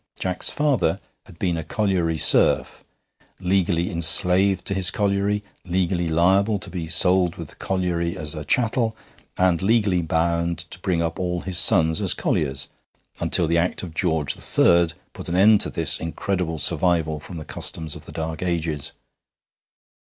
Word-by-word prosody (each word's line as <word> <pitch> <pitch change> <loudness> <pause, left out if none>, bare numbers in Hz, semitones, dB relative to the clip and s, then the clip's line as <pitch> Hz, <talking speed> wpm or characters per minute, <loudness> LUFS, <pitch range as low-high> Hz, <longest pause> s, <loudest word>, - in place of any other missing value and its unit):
Jack's 90 -1 0
father 145 -9 +1 0.3
had - - -15
been 90 -2 -1
a 80 - -4
colliery 90 -5 0
serf, - - +3 0.6
legally 90 -2 0
enslaved 90 +3 +2
to - - -1
his 95 -2 +2
colliery, 100 0 0 0.2
legally 90 -1 -1
liable 95 +6 +2
to - - -8
be 85 -3 -4
sold 90 +2 +3
with 80 -5 -8
the - - -16
colliery 90 -3 -2
as 75 -1 -4
a 75 -2 -6
chattel, 115 0 0 0.4
and 90 -3 +2
legally 100 -3 +2
bound 85 +1 0
to - - -9
bring 90 -3 0
up 80 0 -3
all 90 -1 -2
his 95 -2 -2
sons 80 -6 +3
as - - +2
colliers, 70 -2 -1 0.5
until 85 - +2
the 85 +1 +2
Act 90 +3 -1
of 85 -3 -7
George 80 -4 0
III. 85 0 +3 0.3
put - - -8
an 85 - -1
end 105 +3 +5
to - - +1
this 80 -2 +1
incredible 85 0 -3
survival 80 -1 0
from 85 +4 -9
the 75 - -7
customs 80 -3 -5
of - - -11
the - - -9
Dark 80 -1 -5
Ages. 85 -5 -2
85 Hz, 160 wpm, -23 LUFS, 80-95 Hz, 0.6 s, end